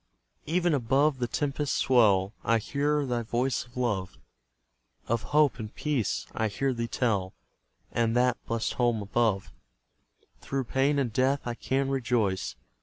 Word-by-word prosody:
Even 175 +1 +2
above 135 +2 +2
the 120 - 0
tempest's 145 +2 -1
swell 105 -6 +4
I 115 +2 +3
hear 145 +5 0
thy 120 -2 -1
voice 120 +3 -1
of 120 - -16
love, 105 -7 -1 0.9
Of 115 0 0
hope 150 -3 +3
and 110 -1 -6
peace, 145 -9 -1
I 110 - 0
hear 135 +6 -1
thee 115 -1 -3
tell, 105 -6 0 0.6
And 115 -1 +1
that 125 0 +2
blest 115 -1 -1
home 120 -4 +1
above; 105 -1 0 0.9
Through 135 -1 -2
pain 135 +4 +1
and 125 -6 0
death 135 +3 +2
I 120 - -2
can 135 +3 -1
rejoice. 115 - 0
120 Hz, 145 wpm, -28 LUFS, 115-135 Hz, 0.9 s, swell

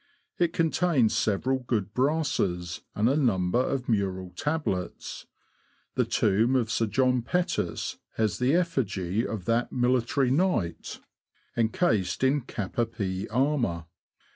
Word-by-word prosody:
It 170 -2 +3
con 165 -2 +1
tains 150 -11 +3
several 120 +6 +1
good 110 -5 -2
brasses, 125 - 0
and 105 +2 +2
a 135 - +3
number 110 -7 +2
of 130 0 -1
mural 95 -4 -1
tablets. 145 - -3 0.7
The - - +1
tomb 110 +5 +2
of 120 -3 +1
Sir 115 -1 +1
J. 125 +3 +2
Pettus 120 - -1 0.2
has 110 -2 0
the 130 +5 +3
effigy 110 - 0
of 105 -5 -5
that 115 +1 +1
military 125 +1 +1
knight, 145 - 0 0.5
encased 115 - +1
in 140 +2 +3
cap 105 -4 -5
a 120 - +3
pie 95 -4 -3
armour. 120 - 0
120 Hz, 130 wpm, -27 LUFS, 100-135 Hz, 0.7 s, It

